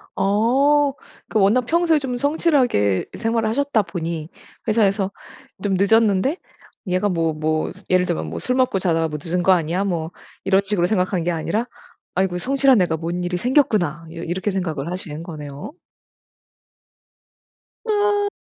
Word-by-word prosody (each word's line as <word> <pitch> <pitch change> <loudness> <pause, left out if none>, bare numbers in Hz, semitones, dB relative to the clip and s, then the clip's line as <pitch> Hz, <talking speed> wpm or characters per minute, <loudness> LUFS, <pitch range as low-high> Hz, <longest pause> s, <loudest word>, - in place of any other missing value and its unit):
어. 270 +8 +3 0.3
그 215 - 0
워낙 210 +6 +4
평소에 330 0 +2
좀 250 -3 -3
성실하게 265 - +2
생활을 225 -1 0
하셨다 280 -2 +1
보니 165 -4 -5 0.4
회사에서 200 -3 +2 0.5
좀 200 -2 +1
늦었는데 220 - +3 0.5
얘가 185 +3 +1
뭐 165 -3 0
뭐 155 +1 -1 0.2
예를 185 0 +3
들면 175 - -2
뭐 - - -5
'술 250 - -1
먹고 255 -6 +2
자다가 165 -3 +1
뭐 150 - -4
늦은 175 +1 -1
거 190 - +5
아니야?' 175 +2 +1
뭐 170 -4 -2 0.3
이런 195 0 +3
식으로 195 -3 0
생각한 185 -3 0
게 175 - 0
아니라 210 +8 -1 0.5
'아이고 185 -1 0
성실한 270 +3 +3
애가 165 -2 +1
뭔 170 +2 -3
일이 175 0 -1
생겼구나.' 205 - +1
이렇 165 +1 -7
이렇게 185 +4 -2
생각을 165 -5 -3
하신 165 -4 -6
거네요. 150 - -8 2.1
아. 410 -1 +2
190 Hz, 305 characters per minute, -21 LUFS, 170-245 Hz, 2.1 s, 거